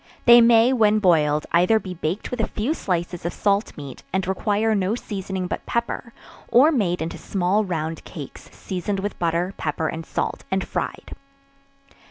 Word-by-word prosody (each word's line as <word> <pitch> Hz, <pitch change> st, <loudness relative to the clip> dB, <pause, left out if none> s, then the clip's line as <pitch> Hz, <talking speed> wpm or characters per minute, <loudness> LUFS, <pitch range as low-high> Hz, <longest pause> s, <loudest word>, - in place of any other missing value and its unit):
They 240 Hz, 0 st, +9 dB
may, 230 Hz, +2 st, +5 dB
when 215 Hz, -3 st, +4 dB
boiled, 155 Hz, -7 st, +3 dB
either 180 Hz, +6 st, +4 dB
be 185 Hz, -3 st, -7 dB
baked 175 Hz, +3 st, -3 dB
with 250 Hz, -, -4 dB
a 220 Hz, -, 0 dB
few 230 Hz, +9 st, -1 dB
slices 175 Hz, -, -3 dB
of 170 Hz, -, -3 dB
salt 200 Hz, +1 st, 0 dB
meat, 140 Hz, -3 st, -9 dB
and 190 Hz, 0 st, 0 dB
require 210 Hz, +3 st, +1 dB
no 200 Hz, +1 st, 0 dB
seasoning 190 Hz, -5 st, -4 dB
but -, -, -4 dB
pepper, 235 Hz, 0 st, -2 dB, 0.4 s
or 275 Hz, +7 st, +5 dB
made 180 Hz, -, 0 dB
into 160 Hz, -, -6 dB
small 195 Hz, +2 st, 0 dB
round 160 Hz, -4 st, -3 dB
cakes, 150 Hz, -7 st, -10 dB
seasoned 195 Hz, +2 st, -4 dB
with 205 Hz, +1 st, -4 dB
butter, 170 Hz, +2 st, 0 dB
pepper 160 Hz, +1 st, -2 dB
and 165 Hz, 0 st, -5 dB
salt, -, -, -3 dB
and 190 Hz, 0 st, -1 dB
fried. -, -, -4 dB
190 Hz, 170 wpm, -23 LUFS, 170-215 Hz, 0.4 s, They